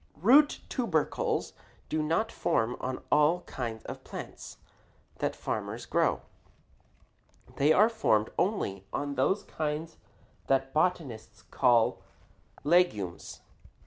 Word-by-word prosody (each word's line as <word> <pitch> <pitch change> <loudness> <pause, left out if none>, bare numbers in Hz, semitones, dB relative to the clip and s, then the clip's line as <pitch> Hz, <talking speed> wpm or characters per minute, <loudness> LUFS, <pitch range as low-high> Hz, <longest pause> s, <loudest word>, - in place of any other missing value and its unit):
Root 265 - +5
tubercles 190 - -1 0.3
do 155 - -1
not 165 +9 0
form 125 -8 0
on 130 0 -4
all 150 +4 +4
kinds 115 -8 -5
of - - -7
plants - - -9 0.6
that - - -1
farmers - - -4
grow. - - +1 1.3
They 145 +3 +4
are 210 +7 +6
formed 110 - +1
only 140 - -1
on 145 0 -2
those 165 +10 +1
kinds 155 +1 -4 0.5
that 135 0 +1
botanists 150 -10 -1
call 120 -3 +3 0.6
legumes. 145 - +1
150 Hz, 105 wpm, -29 LUFS, 125-180 Hz, 1.3 s, are